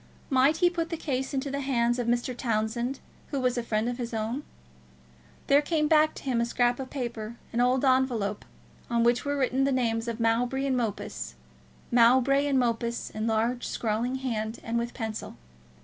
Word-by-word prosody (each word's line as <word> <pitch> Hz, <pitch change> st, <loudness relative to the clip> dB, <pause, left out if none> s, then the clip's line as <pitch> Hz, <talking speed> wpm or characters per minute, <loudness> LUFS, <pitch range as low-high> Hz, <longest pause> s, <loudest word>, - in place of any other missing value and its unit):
Might 270 Hz, +4 st, +4 dB
he 355 Hz, 0 st, +4 dB
put 335 Hz, -2 st, -2 dB
the 330 Hz, -, -3 dB
case 270 Hz, -4 st, -2 dB
into 275 Hz, 0 st, -2 dB
the 280 Hz, -, -2 dB
hands 240 Hz, -3 st, +1 dB
of 240 Hz, -, -1 dB
Mr. 240 Hz, +1 st, 0 dB
Townsend, 235 Hz, +2 st, -1 dB, 0.3 s
who 280 Hz, -, -2 dB
was 250 Hz, -1 st, +1 dB
a 240 Hz, -, 0 dB
friend 220 Hz, -1 st, -1 dB
of 245 Hz, +1 st, -3 dB
his 235 Hz, -1 st, -4 dB
own? 225 Hz, +5 st, -2 dB, 1.0 s
There 280 Hz, +1 st, +5 dB
came 305 Hz, 0 st, +1 dB
back 310 Hz, 0 st, +4 dB
to -, -, -9 dB
him 250 Hz, -4 st, 0 dB
a -, -, +2 dB
scrap 245 Hz, +1 st, +1 dB
of 260 Hz, -1 st, -5 dB
paper, 235 Hz, -4 st, -4 dB, 0.2 s
an 235 Hz, -, +2 dB
old 255 Hz, +2 st, +3 dB
envelope, 250 Hz, -6 st, +1 dB, 0.5 s
on 235 Hz, -1 st, +2 dB
which 240 Hz, +2 st, +2 dB
were 285 Hz, 0 st, 0 dB
written 265 Hz, 0 st, +1 dB
the 275 Hz, -, +2 dB
names 230 Hz, -3 st, 0 dB
of 235 Hz, 0 st, -3 dB
Mowbray 240 Hz, +4 st, +1 dB
and 270 Hz, -2 st, +1 dB
Mopus; 225 Hz, -4 st, -3 dB, 0.6 s
Mowbray 260 Hz, +4 st, +5 dB
and 275 Hz, -2 st, +2 dB
Mopus 235 Hz, -1 st, -1 dB
in 215 Hz, 0 st, -3 dB
a -, -, 0 dB
large 230 Hz, +2 st, 0 dB
scrawling 230 Hz, +3 st, -1 dB
hand, 230 Hz, -4 st, -3 dB
and 230 Hz, +1 st, -1 dB
with 235 Hz, 0 st, -4 dB
pencil. 220 Hz, -3 st, -5 dB
245 Hz, 195 wpm, -28 LUFS, 230-265 Hz, 1.0 s, There